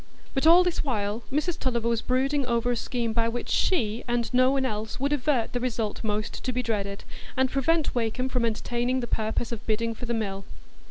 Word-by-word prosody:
But 270 +4 +2
all 345 +2 +8
this 355 -2 0
while 215 -4 -1
Mrs 305 +5 0
Tulliver 240 -3 0
was 230 -1 +1
brooding 270 +3 +1
over 235 0 +1
a - - +1
scheme 235 -1 -2
by 230 0 +2
which 240 +1 -4
she, 230 - +1
and 240 0 -1
no 255 +1 +5
one 270 -1 +1
else, 215 -1 -3
would 280 +2 +1
avert 270 -4 +1
the 245 - 0
result 230 -4 -2
most 215 0 -2
to 255 - 0
be 250 0 -1
dreaded, 200 -4 -2 0.3
and 260 0 +2
prevent 305 +3 +1
Wakem 240 +2 0
from 250 -2 0
entertaining 240 +3 0
the - - -2
purpose 220 0 -1
of 230 -1 -5
bidding 230 +1 0
for 240 +2 -7
the 235 - 0
mill. 195 -3 -3
240 Hz, 210 wpm, -27 LUFS, 225-260 Hz, 0.3 s, all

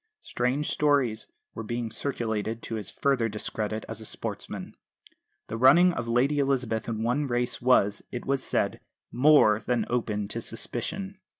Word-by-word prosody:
Strange 130 +5 -1
stories 140 -7 +1 0.3
were - - -6
being 115 +1 -3
circulated 115 -4 -2
to - - -6
his 105 -4 -3
further 130 -5 +1
discredit 110 +1 -3
as 115 -1 -6
a - - -8
sportsman. - - -6 0.7
The 115 - -5
running 170 +8 +6
of 120 -7 -4
Lady 130 +5 +2
Elizabeth 130 -5 0
in 110 -1 -2
one 135 +5 0
race 120 -1 -1
was, 105 -5 +3
it 120 - -5
was 135 0 0
said, - - 0 0.3
more 125 -5 +5
than 120 +3 -1
open 105 -4 -1
to 115 - -2
suspicion. 170 - -4
120 Hz, 155 wpm, -27 LUFS, 110-135 Hz, 0.7 s, running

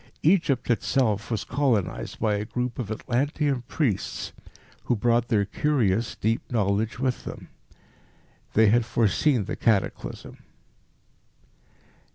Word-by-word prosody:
Egypt 155 -8 +3
itself 110 -3 +1
was 115 -3 -1
colonised 125 -8 -1
by 110 -2 +1
a 105 0 -1
group 125 +3 -3
of 115 -5 -3
Atlantean 135 +4 -1
priests 115 - -2 0.5
who 125 - +2
brought 120 +2 +2
their 105 -3 +2
curious, 115 -4 0
deep 110 +2 0
knowledge 105 0 0
with 130 -1 -1
them. - - -8 1.0
They 110 -1 +5
had 120 +3 +4
foreseen 115 +2 +2
the - - -4
cataclysm. 110 -5 -1
115 Hz, 115 wpm, -26 LUFS, 105-130 Hz, 1.0 s, They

